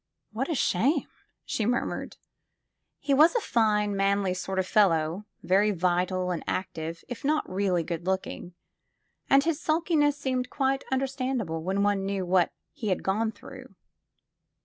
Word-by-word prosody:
What 245 +7 -3
a 325 - 0
shame!" 270 - +1 0.4
she 220 - -2
murmured. 245 +1 -2 0.8
He 280 0 -1
was 310 - +6
a - - +4
fine, 210 - +1
manly 195 -1 +1
sort 190 +1 -4
of 190 - +1
fellow, 180 -2 +2 0.2
very 200 +3 +3
vital 180 0 0
and 170 - -3
active, 165 -3 -4
if 245 - -7
not 300 +2 +1
really 185 -2 0
good 170 +1 -5
looking, 190 -2 -3 0.7
and 275 0 +6
his 325 -1 -1
sulkiness 310 -3 +2
seemed 255 -3 -2
quite 270 -1 0
understand 265 -1 -1
able 165 -3 -4
when 190 +4 0
one 205 -1 +1
knew 195 -1 -2
what 180 -1 +3 0.2
he 220 - -5
had 185 - 0
gone 220 +3 0
through. - - -13
205 Hz, 150 wpm, -27 LUFS, 185-265 Hz, 0.8 s, was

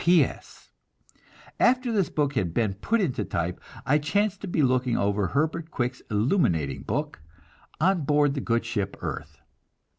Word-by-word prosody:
P. 175 0 +6
S. - - -8 0.9
After 250 0 +3
this 200 -5 +1
book 145 -2 0
had 90 - -1
been 110 -4 +1
put 220 - 0
into 130 - 0
type, 85 -1 -3 0.2
I 145 +3 +3
chanced 195 +6 0
to 200 - -5
be 165 -4 +1
looking 125 -2 +2
over 100 0 +1
Herbert 160 - -1
Quick's 125 -3 -2
illuminating 105 - +1
book, 150 - -3 0.6
"On 180 +2 +3
Board 145 0 +3
the 140 - -3
Good 115 -1 0
Ship 100 -4 -3
Earth." 75 -3 -6
140 Hz, 155 wpm, -26 LUFS, 105-165 Hz, 0.9 s, P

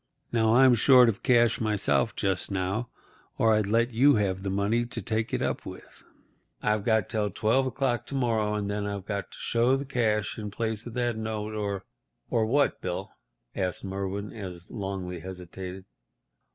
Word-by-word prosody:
Now, 110 -1 +3
I'm 130 0 +7
short 125 +1 +6
of 105 - -3
cash 120 -2 +4
myself 110 +1 +1
just 95 -2 -1
now, 100 +5 -2 0.5
or 110 -1 +4
I'd 105 -2 +2
let 115 +3 +2
you 135 +5 +5
have 95 -3 0
the 95 - -3
money 100 +5 +1
to 120 - -5
take 110 0 -2
it - - -1
up - - -2
with. - - -11 0.6
I've 105 -1 0
got 110 -3 +2
till 105 -2 -1
twelve 115 +7 +1
o'clock 125 -2 -1
to 140 - -5
morrow, 110 -5 +1
and 105 -1 -2
then 100 0 -2
I've 100 -2 -4
got 100 -1 -3
to - - -12
show 120 +3 +2
the 140 - -5
cash 110 -6 0
in 105 -1 -4
place 110 +2 -3
of 120 - -8
that 120 -2 0
note 110 -1 -3
or—" 100 -3 -3 0.5
"Or 110 -1 +2
what, 140 +4 +2
Bill?" 90 -1 -4 0.4
asked 90 -1 -2
Merwin, 100 +1 -4
as 90 -5 -8
Longley 95 -4 -4
hesitated. 95 +1 -8
110 Hz, 180 wpm, -27 LUFS, 100-120 Hz, 0.6 s, I'm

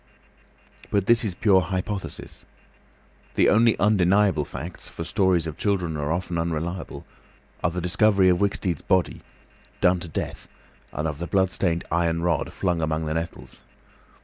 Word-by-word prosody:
But 100 -2 +1
this 115 +2 +4
is 100 -5 -2
pure 95 -1 +4
hypothesis. 95 +3 -5 0.9
The - - +4
only 115 +2 +4
undeniable 95 -5 +3
facts—for 85 +1 -7
stories 90 -2 +1
of 80 -3 -6
children 90 -6 0
are 75 0 -2
often 85 0 -2
unreliable—are 85 +2 -5
the 90 +2 -4
discovery 95 +2 +3
of 90 -1 +3
Wicksteed's 95 -5 -1
body, 95 -2 0 0.6
done 90 0 +3
to 85 - -7
death, 80 - -5 0.4
and 75 - -2
of 75 -1 -5
the 85 - -4
blood 95 +2 +2
stained 85 -2 0
iron 85 -1 +1
rod 85 -4 0
flung 90 -3 -1
among 80 0 -1
the 75 - -2
nettles. 80 +1 -5
90 Hz, 145 wpm, -24 LUFS, 85-95 Hz, 0.9 s, this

